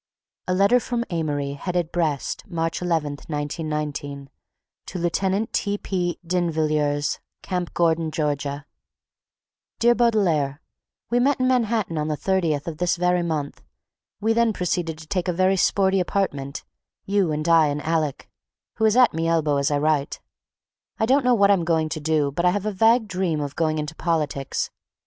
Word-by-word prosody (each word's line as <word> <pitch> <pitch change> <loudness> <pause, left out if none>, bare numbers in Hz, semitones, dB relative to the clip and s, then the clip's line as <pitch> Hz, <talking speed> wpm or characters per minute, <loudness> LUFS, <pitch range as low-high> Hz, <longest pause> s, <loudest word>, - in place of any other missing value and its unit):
A 185 - +1
letter 200 +6 +4
from 240 0 -2
Amory, 145 -4 -1
headed 175 +3 -2
"Brest, 155 -5 -1
March 165 -1 -2
11th, 160 -5 -2
1919," 145 -2 -4 0.6
to - - -5
Lieutenant 190 +5 0
T. 205 0 0
P. 175 -4 -2
D'Invilliers, 155 -4 0 0.2
Camp 180 -2 -3
Gordon, 165 -1 +2
Ga. 145 -2 -2 1.2
DEAR 240 +1 +4
BAUDELAIRE:— 185 - +2 0.5
We 240 - +3
meet 270 +2 +2
in 255 - +2
Manhattan 225 -9 +1
on 150 - -1
the 150 -1 -1
30th 170 -7 0
of 160 -2 -6
this 180 0 +2
very 180 0 +1
mo.; 155 -4 -2 0.7
we 220 +2 +2
then 230 -1 +2
proceed 180 -2 -1
to 160 - -3
take 165 +4 -3
a - - +2
very 185 +2 +2
sporty 190 +1 +2
apartment, 145 -7 -2 0.4
you 195 -4 +1
and 155 +2 -2
I 165 -2 +5
and 145 0 -2
Alec, 155 -3 -1 0.5
who 220 - +2
is 220 +2 +3
at 250 -2 +6
me 165 +1 -1
elbow 155 -3 +2
as 140 0 +1
I 145 - +1
write. 150 -1 0 0.8
I 220 - +3
don't 270 +4 +3
know 250 -1 +4
what 200 -2 +5
I'm 190 -4 +3
going 160 -2 +1
to 155 - -4
do 150 -2 +1
but 170 +5 -2
I 180 - +5
have 200 +2 -1
a 215 - 0
vague 225 +3 +3
dream 180 -5 -1
of 145 -1 -4
going 155 -1 0
into 150 +1 -3
politics. 150 -5 -2
165 Hz, 170 wpm, -23 LUFS, 150-195 Hz, 1.2 s, at